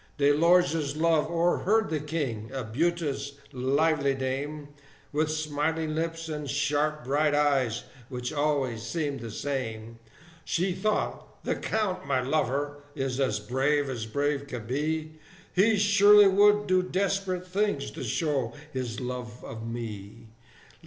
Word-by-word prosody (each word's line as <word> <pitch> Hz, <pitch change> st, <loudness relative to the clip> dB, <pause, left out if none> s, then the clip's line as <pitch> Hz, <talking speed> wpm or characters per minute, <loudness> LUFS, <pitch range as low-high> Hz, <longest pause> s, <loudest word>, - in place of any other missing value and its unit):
De 145 Hz, 0 st, +4 dB
Lorge's 160 Hz, -2 st, +3 dB
love 160 Hz, -1 st, +2 dB
o'erheard 175 Hz, +5 st, +2 dB
the 155 Hz, -, 0 dB
King, 140 Hz, -8 st, -3 dB
a 130 Hz, -, -2 dB
beauteous, 140 Hz, +3 st, -1 dB, 0.2 s
lively 140 Hz, +2 st, +2 dB
dame, 140 Hz, +3 st, -3 dB, 0.4 s
With 150 Hz, +1 st, +1 dB
smiling 155 Hz, +1 st, -1 dB
lips, 165 Hz, +1 st, -2 dB
and 150 Hz, -2 st, -4 dB
sharp 150 Hz, +1 st, 0 dB
bright 145 Hz, +3 st, +2 dB
eyes, 135 Hz, -6 st, +2 dB, 0.3 s
which 125 Hz, +2 st, -4 dB
always 145 Hz, -6 st, 0 dB
seemed 145 Hz, +3 st, -2 dB
the 115 Hz, -1 st, -6 dB
same: 115 Hz, -3 st, -4 dB, 0.4 s
She 180 Hz, +3 st, 0 dB
thought, 210 Hz, +4 st, -2 dB
"The -, -, 0 dB
Count, 190 Hz, -7 st, -2 dB
my 135 Hz, -2 st, +2 dB
lover, 145 Hz, +1 st, -1 dB, 0.2 s
is 135 Hz, -1 st, -2 dB
as 135 Hz, -, +1 dB
brave 140 Hz, +2 st, +1 dB
as 115 Hz, -3 st, -4 dB
brave 140 Hz, +4 st, -1 dB
can 125 Hz, -5 st, -6 dB
be; 155 Hz, +5 st, -2 dB, 0.3 s
He 210 Hz, +4 st, +4 dB
surely 205 Hz, 0 st, +7 dB
would 205 Hz, +2 st, +5 dB
do 185 Hz, -2 st, +3 dB
desperate 185 Hz, 0 st, -1 dB
things 185 Hz, -6 st, -1 dB
to -, -, -7 dB
show 130 Hz, -1 st, -1 dB, 0.2 s
his 125 Hz, -4 st, -3 dB
love 125 Hz, -2 st, -6 dB
of 110 Hz, 0 st, -7 dB
me! 115 Hz, -1 st, -7 dB
145 Hz, 135 wpm, -28 LUFS, 130-165 Hz, 0.4 s, surely